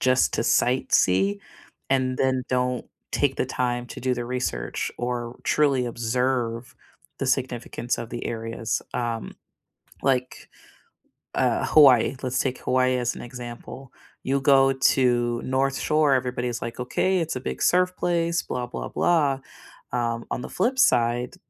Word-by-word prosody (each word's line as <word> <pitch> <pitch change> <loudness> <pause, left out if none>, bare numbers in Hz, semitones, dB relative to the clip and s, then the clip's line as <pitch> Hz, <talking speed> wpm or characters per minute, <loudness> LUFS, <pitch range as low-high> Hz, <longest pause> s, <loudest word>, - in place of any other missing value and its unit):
just 130 0 +3
to - - 0
sightsee 100 -6 +2 0.5
and 130 -1 +1
then 130 -1 +1
don't 125 -1 -1 0.3
take 140 -2 +1
the - - +1
time 120 -1 -1
to - - -8
do 130 0 0
the 120 -1 -4
research 125 - -3
or 120 -1 -3
truly 140 -4 +2
observe 120 0 -1 0.4
the 135 - -2
significance 125 -2 -1
of 115 - -5
the 120 - -5
areas. 115 -1 -3
Um, 115 -2 -3 0.7
like, 130 -2 -1 0.9
uh, - - +1
Hawaii, 135 -4 +6
let's 130 0 -1
take 130 -1 -1
Hawaii 130 0 +2
as 125 0 -1
an - - -8
example. 120 +1 -9 0.3
You 135 +1 0
go 135 0 +5
to 120 -3 +2
North 135 +1 0
Shore, 150 -2 +3
everybody's 125 -2 -1
like, 115 +1 -6
"Okay. 185 +9 +1
It's 165 -4 -2
a - - -2
big 65 0 -5
surf 180 0 +3
place, 170 -1 0
blah, 125 -1 -4
blah, 125 - -6
blah." 145 -6 +2 0.5
um, 115 -1 -1
on - - -2
the - - -7
flip 245 +8 0
side, 120 - +2
125 Hz, 145 wpm, -25 LUFS, 120-135 Hz, 0.9 s, Hawaii